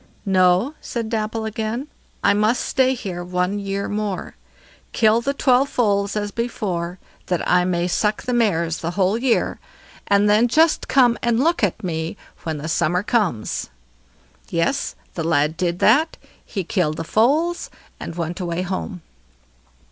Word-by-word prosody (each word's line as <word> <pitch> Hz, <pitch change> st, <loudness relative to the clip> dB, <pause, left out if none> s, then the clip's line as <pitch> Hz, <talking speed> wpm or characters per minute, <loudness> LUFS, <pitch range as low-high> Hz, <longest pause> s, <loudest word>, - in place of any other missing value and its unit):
"No", 185 Hz, +6 st, +3 dB
said 230 Hz, -2 st, -4 dB
Dapple 220 Hz, 0 st, -2 dB
again, 220 Hz, +5 st, -3 dB, 0.4 s
"I 200 Hz, -, +5 dB
must 215 Hz, +4 st, +1 dB
stay 260 Hz, 0 st, +2 dB
here 180 Hz, -6 st, -5 dB
one 180 Hz, +3 st, -1 dB
year 200 Hz, 0 st, -3 dB
more. 205 Hz, -3 st, -3 dB, 0.6 s
Kill 220 Hz, +1 st, +4 dB
the 275 Hz, -, 0 dB
twelve 265 Hz, 0 st, +3 dB
foals 200 Hz, -4 st, +1 dB
as 205 Hz, -1 st, -2 dB
before, 185 Hz, -7 st, -3 dB, 0.3 s
that 180 Hz, -2 st, -1 dB
I 180 Hz, 0 st, +4 dB
may 175 Hz, -1 st, 0 dB
suck 210 Hz, +4 st, 0 dB
the 250 Hz, -, -2 dB
mares 170 Hz, -8 st, +1 dB
the 165 Hz, -, -3 dB
whole 190 Hz, +1 st, +3 dB
year, 235 Hz, 0 st, +1 dB, 0.5 s
and 200 Hz, +1 st, +4 dB
then 215 Hz, +3 st, +4 dB
just 315 Hz, +6 st, +3 dB
come 245 Hz, -3 st, +4 dB
and 235 Hz, -1 st, +1 dB
look 335 Hz, -4 st, +1 dB
at 205 Hz, +2 st, 0 dB
me 160 Hz, -2 st, -3 dB, 0.2 s
when 160 Hz, -2 st, -3 dB
the 150 Hz, +2 st, -5 dB
summer 175 Hz, +3 st, +1 dB
comes." 205 Hz, -, -1 dB, 0.8 s
Yes! 170 Hz, +12 st, 0 dB, 0.2 s
the 165 Hz, -, -3 dB
lad 155 Hz, -1 st, +2 dB
did 175 Hz, 0 st, -1 dB
that; 290 Hz, -, +3 dB, 0.3 s
he 195 Hz, -4 st, -4 dB
killed 165 Hz, -4 st, 0 dB
the -, -, -3 dB
foals, 300 Hz, -, +1 dB, 0.3 s
and 165 Hz, -, -6 dB
went 170 Hz, 0 st, -3 dB
away 175 Hz, 0 st, -2 dB
home. 185 Hz, -1 st, -4 dB
200 Hz, 155 wpm, -21 LUFS, 175-235 Hz, 0.8 s, I